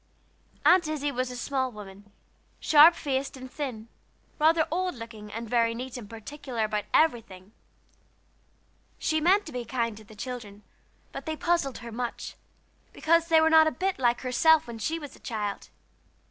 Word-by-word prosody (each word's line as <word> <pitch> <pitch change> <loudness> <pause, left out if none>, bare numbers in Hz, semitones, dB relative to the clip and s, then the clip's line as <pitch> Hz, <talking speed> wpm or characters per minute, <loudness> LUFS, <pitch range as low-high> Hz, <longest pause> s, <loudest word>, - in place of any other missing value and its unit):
Aunt 355 -3 +5
Izzie 290 -2 -2
was 255 -1 -2
a 250 - -7
small 260 0 -2
woman, 205 -1 -12 0.5
sharp 315 +3 +7
faced 270 -2 -3
and 260 0 -10
thin, 250 -7 -5 0.5
rather 320 +1 +4
old 365 0 -1
looking, 225 -3 -10
and 230 +2 -6
very 230 0 +1
neat 255 +1 -6
and 230 -5 -8
particular 235 +1 -5
about 210 -1 -2
everything. 225 -10 +1 1.5
She 315 0 0
meant 390 +5 +3
to 315 - -8
be 250 -3 -4
kind 235 -2 -2
to 220 - -12
the 215 0 -16
children, 210 -3 -7 0.5
but - - -8
they 315 0 -3
puzzled 335 -7 0
her 235 - -7
much, 240 +1 -5 0.6
because 335 +1 +2
they 325 -1 +5
were 320 0 +3
not 320 0 +7
a - - +2
bit 380 -1 -2
like 240 -2 +2
herself 315 +5 +4
when 230 -1 -8
she 315 +10 -1
was 290 -4 -9
a - - -18
child. 210 -4 -4
255 Hz, 170 wpm, -27 LUFS, 230-315 Hz, 1.5 s, sharp